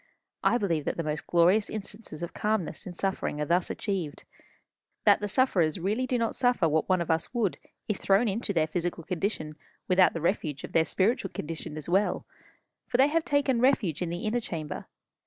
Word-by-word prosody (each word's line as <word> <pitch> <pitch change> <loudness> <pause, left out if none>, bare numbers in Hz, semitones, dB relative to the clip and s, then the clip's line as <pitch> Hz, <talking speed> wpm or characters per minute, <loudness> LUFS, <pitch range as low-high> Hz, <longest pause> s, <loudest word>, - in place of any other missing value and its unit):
I - - +4
believe 170 -9 -1
that - - -2
the 165 - -1
most 155 0 -3
glorious 180 +5 +4
instances 205 -5 -5
of 170 - -5
calmness 210 -5 -2
in 175 - -7
suffering 190 -5 -2
are 150 - 0
thus 175 +3 +1
achieved; 185 -8 -3 0.8
that - - +6
the 205 - -2
sufferers 190 - +2
really 215 +8 0
do 250 - +1
not 230 -1 0
suffer 245 -9 +2
what 160 +2 0
one 185 -2 +3
of 170 - -1
us 160 0 0
would 220 -6 0 0.3
if 210 -4 -1
thrown 200 +5 +3
into 210 +1 -1
their 165 -5 +2
physical 170 +1 -3
condition 160 -4 -3 0.3
without 185 0 +5
the - - -1
refuge 155 -5 -1
of - - -7
their 160 -1 +3
spiritual 195 +2 +1
condition 155 -2 -5
as 150 - -6
well; 190 +4 +1 0.6
for 240 - 0
they 270 +3 +5
have 330 +1 +1
taken 280 -5 +1
refuge 225 - +2
in 175 - -1
the 175 +1 -4
inner 225 +3 +1
chamber. 155 -8 -5
185 Hz, 195 wpm, -28 LUFS, 165-220 Hz, 0.8 s, that